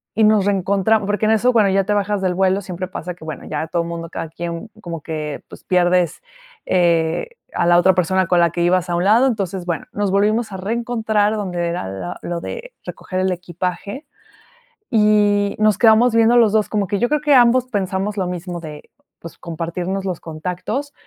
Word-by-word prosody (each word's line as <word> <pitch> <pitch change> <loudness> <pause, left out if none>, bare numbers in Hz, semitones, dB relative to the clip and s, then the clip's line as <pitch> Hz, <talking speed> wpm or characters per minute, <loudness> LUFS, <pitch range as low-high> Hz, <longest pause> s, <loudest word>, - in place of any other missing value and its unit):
y 220 - +3
nos 215 -2 +4
reencontram 200 +2 +1
porque 205 +1 0
en 215 - +3
eso 240 +3 +3
bueno, 215 -4 +4
ya 195 0 +2
te 210 - 0
bajas 205 0 0
del 185 -1 0
vuelo, 190 +1 +2
siempre 185 0 -5
pasa 180 -1 -6
que, 170 - -15
bueno, 155 -2 -7
ya 155 +1 -3
todo 170 +1 -1
mundo 170 0 -6
cada 165 - -5
quien 170 +5 -6
como 170 -2 -6
que 155 -2 -5
pues, - - -13
pierdes, 180 -1 +1 0.4
eh, 170 - +1 0.2
a - - 0
la 175 - +5
otra 185 +2 +5
persona 185 +1 +1
con 175 - +3
la 170 - +4
que 170 - -3
ibas 180 +1 +1
a 175 - 0
un 175 +2 0
lado. 230 +6 +5
Entonces, 195 -6 -2
bueno, 170 -4 -3
nos 205 -2 -1
volvimos 215 +3 +1
a 190 - -5
reencontrar 220 0 0
donde 180 -4 -2
era 170 - -3
la 95 -2 -6
lo 170 -1 -4
de - - -7
recoger 185 - -5
el 185 0 +1
equipaje, 180 - -5 0.9
y 205 -1 +3
nos 215 -2 +3
quedamos 230 +1 +5
viendo 230 +1 +4
los 225 -4 +5
2 215 -1 +2
como 205 -2 -1
que 200 +2 -1
yo 240 - +2
creo 300 +2 +1
que 295 -1 +4
ambos 245 0 +5
pensamos 200 -2 -2
lo 185 - 0
mismo 180 -1 -5
de, 150 -2 -10 0.3
pues, 170 - -11
compartirnos 175 +3 -4
los 180 -3 -3
contactos, 180 - -4
190 Hz, 200 wpm, -19 LUFS, 175-215 Hz, 0.9 s, la